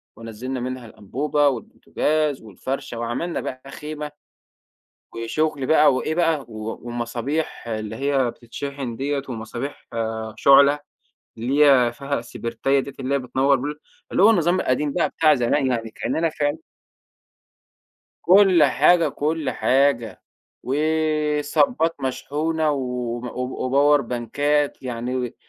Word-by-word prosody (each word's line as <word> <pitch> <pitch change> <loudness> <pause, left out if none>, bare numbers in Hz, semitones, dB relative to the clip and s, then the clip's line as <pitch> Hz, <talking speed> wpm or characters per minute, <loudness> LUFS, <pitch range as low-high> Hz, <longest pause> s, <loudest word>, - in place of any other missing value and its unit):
ونزّلنا 115 +3 -6
منها 130 0 -5
الأنبوبة 140 +8 -1
والبوتجاز 145 +3 -1
والفرشة 115 +2 -5
وعملنا 120 +9 -2
بقى 130 +2 -7
خيمة، 150 0 -6 1.0
وشغل 135 +4 -1
بقي 155 0 +5
وإيه 155 +4 -1
بقى 165 -3 +2
و 110 0 -6
ومصابيح 120 +4 -3
اللي 110 0 -4
هي 135 -2 +1
بتتشحن 125 +1 -6
ديَّة 140 +1 -2
ومصابيح 120 +4 -6 0.5
شُعلة، 140 +3 +6 0.6
اللي 135 +6 +3
هي 125 -4 +5
فيها 140 +2 -3
السبرتاية 120 +3 -1
ديّة 140 - -7
اللي 135 +1 -1
هي 140 - +3
بتنور 135 +2 +2
ب 125 - -6 0.5
اللي - - +2
هو 210 - +8
النظام 180 -3 +2
القديم 140 +3 0
ده 175 - +1
بتاع 155 -2 +3
زمان 135 +3 +1
يعني 115 -3 -1
كأننا 165 +7 -1
فعلًا 150 0 -1 1.6
كُل 185 -3 +6
حاجة، 150 +6 +4
كُل 150 -1 -1
حاجة، 130 0 +1 0.4
وصَبَّات 155 - +1
مشحونة 155 +4 -1
وم 125 -3 -3
و 125 +1 -4
وباور 145 +2 +4
بانكات 140 +5 -1
يعني، 125 0 -3
140 Hz, 120 wpm, -22 LUFS, 120-150 Hz, 1.6 s, هو